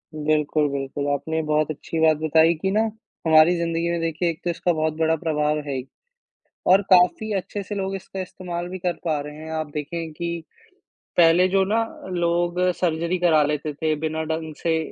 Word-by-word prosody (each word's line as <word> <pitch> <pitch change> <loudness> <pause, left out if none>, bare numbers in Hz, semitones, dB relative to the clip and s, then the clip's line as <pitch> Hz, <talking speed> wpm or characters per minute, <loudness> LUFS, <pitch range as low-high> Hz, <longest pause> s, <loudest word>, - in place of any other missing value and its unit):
बिल्कुल, 150 0 +1
बिल्कुल। 140 +1 -3
आपने 160 +3 -2
बहुत 155 0 +1
अच्छी 160 +2 -5
बात 160 -1 +4
बताई 160 +2 +4
कि 190 0 0
ना 215 +2 +3 0.5
हमारी 160 +2 +6
जिंदगी 170 0 -1
में 170 0 -1
देखिए 165 +1 0
एक 160 - -4
तो 175 - -1
इसका 175 +1 0
बहुत 155 0 0
बड़ा 160 0 +2
प्रभाव 150 -1 0
है 140 - -2
ही 130 0 -4 0.9
और 195 +2 +6
काफ़ी 185 +4 +4
अच्छे 200 +1 -3
से 205 +2 -6
लोग 195 -1 -2
इसका 190 0 -7
इस्तेमाल 175 -1 -5
भी 185 +1 -6
कर 180 0 0
पा 155 -3 +1
रहे 150 +1 -7
हैं। 160 +1 -8
आप 155 -2 -3
देखें 160 +2 -4
कि 170 +1 -4 0.8
पहले 175 +2 +6
जो 195 +1 +2
ना 225 +3 +1 0.3
लोग 175 0 0 0.2
सर्जरी 170 +1 0
करा 165 -4 +4
लेते 150 0 -2
थे, 155 +1 0
बिना 160 +1 -2
ढंग 160 0 -4
से 165 -1 +2
160 Hz, 190 wpm, -23 LUFS, 155-175 Hz, 0.9 s, हमारी